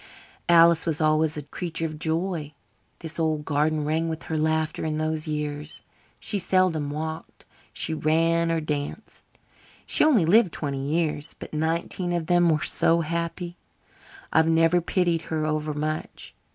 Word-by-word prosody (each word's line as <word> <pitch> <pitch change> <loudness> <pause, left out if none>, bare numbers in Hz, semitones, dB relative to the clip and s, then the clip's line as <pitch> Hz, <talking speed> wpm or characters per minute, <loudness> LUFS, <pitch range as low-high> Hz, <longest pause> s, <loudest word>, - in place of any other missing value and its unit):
"Alice 170 -1 +6
was 155 -2 0
always 155 0 +2
a 150 - -4
creature 165 +3 -4
of 155 -1 -5
joy. 160 -2 -2 0.5
This 165 0 -6
old 155 -2 0
garden 150 +1 +1
rang 160 +2 0
with 160 0 -5
her 160 - -4
laughter 155 0 0
in 155 -1 -1
those 155 0 -1
years. 150 0 -4 0.4
She 205 - -2
seldom 180 -5 +1
walked 160 +2 -6 0.3
she 160 - -1
ran 165 +2 +2
or 165 -1 0
danced. 150 +7 -5 0.6
She - - +2
only 265 - +4
lived 195 +1 +4
twenty 140 -3 -3
years, 150 0 -1
but - - -10
nineteen 165 +3 -1
of 170 -2 -1
them 175 0 +3
were 155 -1 +1
so 165 +1 +2
happy 170 +2 -4 0.8
I've 160 0 +4
never 165 +2 +4
pitied 170 -1 0
her 155 -1 -1
over 155 0 -1
much. 155 +1 -4
160 Hz, 150 wpm, -25 LUFS, 155-170 Hz, 0.8 s, Alice